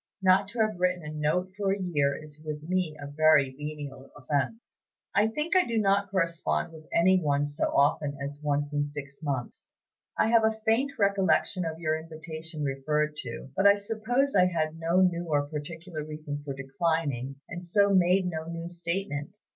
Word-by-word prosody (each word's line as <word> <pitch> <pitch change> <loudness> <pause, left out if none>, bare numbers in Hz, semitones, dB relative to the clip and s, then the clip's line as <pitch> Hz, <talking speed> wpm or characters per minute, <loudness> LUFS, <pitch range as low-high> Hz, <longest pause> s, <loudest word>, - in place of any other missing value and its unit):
Not 190 +1 +5
to 230 +3 -7
have 215 -4 0
written 180 -1 +1
a 150 0 -6
note 155 +5 0
for 200 -1 0
a 195 - +1
year 145 -6 +1
is 155 -1 -11
with 150 -1 -5
me 175 -2 -1
a 140 - -6
very 145 -1 +4
venial 145 -1 -7
offense. 145 - -2 0.4
I 205 +2 +4
think 300 - -2
I 370 - +6
do 230 -6 -2
not 200 -1 +2
correspond 170 -2 0
with 155 -1 -13
any 185 +2 +4
one 145 -2 +1
so 145 +2 -1
often 145 0 +2
as 140 +1 -5
once 145 0 -1
in 145 0 +1
six 140 0 -8
months. 135 -6 -4 0.4
I - - +3
have 230 -1 +5
a 220 0 +1
faint 255 +6 +2
recollection 195 -2 +2
of 160 -1 -3
your 155 -1 0
invitation 160 -1 -7
referred 150 +2 0
to; 125 +1 -7
but 195 - +5
I 200 - +7
suppose 225 +7 0
I 180 -2 +5
had 160 -2 -2
no 170 +3 +2
new 175 -2 +2
or 145 -2 +1
particular 160 +2 -6
reason 150 -1 -6
for 140 -2 -5
declining, 140 -1 -1
and 175 +1 -7
so 200 +3 +3
made 185 0 +4
no 160 -3 -3
new 170 0 -5
statement. 170 -2 -3
160 Hz, 185 wpm, -28 LUFS, 145-190 Hz, 0.4 s, I